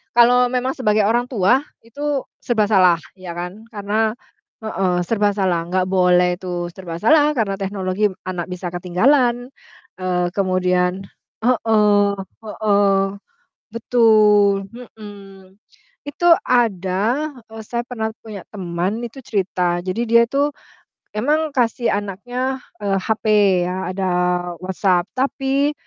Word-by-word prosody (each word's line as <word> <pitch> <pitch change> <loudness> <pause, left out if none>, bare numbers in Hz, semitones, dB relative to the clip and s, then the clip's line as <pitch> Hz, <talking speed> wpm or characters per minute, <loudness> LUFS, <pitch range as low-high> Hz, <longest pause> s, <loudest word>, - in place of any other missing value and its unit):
Kalau 245 +1 +5
memang 255 +1 -1
sebagai 215 -5 +2
orang 235 +3 +2
tua, 245 +2 +2 0.2
itu 285 +4 -4 0.2
serba 220 -4 +1
salah, 185 -5 +4 0.2
ya 185 -2 -8
kan. 180 +5 -7
Karena 215 +1 0 0.5
heeh, 190 -5 -1
serba 210 -2 +1
salah 185 -4 0
nggak 185 0 +1
boleh, 180 -1 +3
itu 175 -1 -4
serba 170 -3 -7
salah, 295 - +4
karena 220 -8 -1
teknologi 195 +1 -1 0.2
anak 180 -1 -4
bisa 180 0 -5
ketinggalan. 240 +8 +1 0.5
Eee, 180 -1 -1
kemudian 185 0 0 0.3
heeh 210 -4 +3 0.3
heeh, 205 -2 +2 0.7
betul, 215 -4 +3
mhm. 200 -5 -13 0.5
Itu 345 +5 +1 0.2
ada, 230 - 0 0.2
e - - -13
saya 235 +1 -2
pernah 220 -3 -3
punya 210 -4 -8
teman 185 +3 -3
itu 240 +3 -7
cerita, 180 -5 -1
jadi 185 +6 -2
dia 235 +1 +5
itu 280 +4 0 0.7
emang 300 +7 0
kasih 240 -1 +1
anaknya, 245 +7 -3 0.2
eee, 200 -1 0
HP, 220 +3 -2 0.4
ya, 180 - -3 0.2
ada 190 0 -2 0.5
WhatsApp, 185 -1 0
tapi 275 +2 0
205 Hz, 120 wpm, -20 LUFS, 185-240 Hz, 0.7 s, Kalau